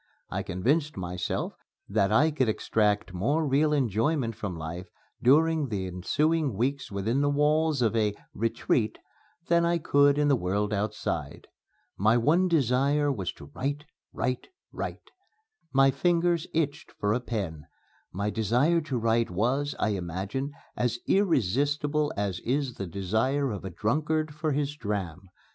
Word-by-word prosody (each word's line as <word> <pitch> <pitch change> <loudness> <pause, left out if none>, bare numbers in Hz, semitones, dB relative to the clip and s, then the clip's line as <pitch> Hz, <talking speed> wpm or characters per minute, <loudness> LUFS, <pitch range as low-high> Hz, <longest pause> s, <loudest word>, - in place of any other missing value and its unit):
I - - -1
convinced 145 - 0
myself 90 -1 -3 0.3
that 100 +1 +1
I 150 +9 +4
could 130 -6 +1
extract 105 -3 0
more 145 - +1
real 145 +3 +3
enjoyment 125 -1 +1
from 95 -5 -5
life 80 +3 -6 0.3
during 155 +3 +4
the 100 -4 -2
ensuing 140 - 0
weeks 135 +2 -1
within 110 +7 0
the 145 - +2
walls 150 -1 +2
of 115 0 +1
a 105 -2 +1 0.2
"retreat" 115 0 0 0.5
than 170 0 +4
I 170 0 +2
could 145 -2 +4
in 150 0 +3
the 140 - +5
world 105 0 -1
outside. 105 +1 -3 0.5
My 110 +4 +4
one 165 +10 +3
desire 145 -1 +2
was 95 -9 -3
to 70 - -13
write, 145 +2 -3 0.3
write, 125 0 -2 0.2
write. - - -6 0.6
My 135 0 +5
fingers 170 +3 +1
itched 155 -3 -2
for 105 0 0
a 120 - +1
pen. 95 - -4 0.4
My 100 +3 -2
desire 125 +11 +2
to 145 -5 -3
write 115 0 +1
was, 125 +10 0
I 105 - +1
imagine, 100 - -3 0.2
as 120 -1 0
irresistible 145 - +1
as 100 -3 -1
is 135 +1 -1
the 95 - -5
desire 110 - 0
of 100 - -5
a 95 - -4
drunkard 150 - -1
for 155 0 -1
his 145 +1 -1
dram. 95 - -4
125 Hz, 145 wpm, -28 LUFS, 105-150 Hz, 0.6 s, the